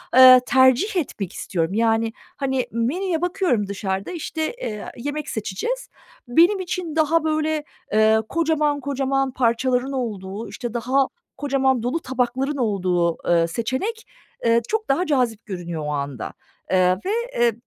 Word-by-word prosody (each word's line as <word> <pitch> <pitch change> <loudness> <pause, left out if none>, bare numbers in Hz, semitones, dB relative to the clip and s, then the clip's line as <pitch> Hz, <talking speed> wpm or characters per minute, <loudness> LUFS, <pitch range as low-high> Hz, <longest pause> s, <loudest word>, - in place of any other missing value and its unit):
Eee, 255 -1 +10
tercih 260 - +4
etmek 215 - -3
istiyorum. 170 +1 -2
Yani, 225 0 +1 0.2
hani, 265 -2 -1
menüye 320 - -1
bakıyorum 355 - +1
dışarıda, 195 - -3
işte, 320 0 -3
eee, 210 -1 -4
yemek 290 +4 -4
seçeceğiz. 470 - -3 0.4
Benim 340 +11 +4
için 355 -3 -4
daha 320 +1 +3
böyle, 310 -1 0 0.3
eee, 220 0 +5
kocaman 305 -3 +1
kocaman 270 -1 0
parçaların 250 +2 +1
olduğu, 215 -5 -4
işte, 240 -3 -6
daha 260 +3 +1 0.3
kocaman, 265 -3 +1
dolu 255 +7 0
tabakların 260 +2 -1
olduğu, 180 -7 +1
eee, 170 -1 +3
seçenek, 260 - -3 0.4
eee, 230 0 +4
çok 440 0 -2
daha 345 +7 +2
cazip 245 -7 0
görünüyor 175 -5 -5
o 150 - -2
anda. 140 -4 -4 0.4
Eee, 185 -1 +4
ve, 395 - 0 0.3
eee, 235 -1 +4
255 Hz, 135 wpm, -22 LUFS, 220-305 Hz, 0.4 s, Eee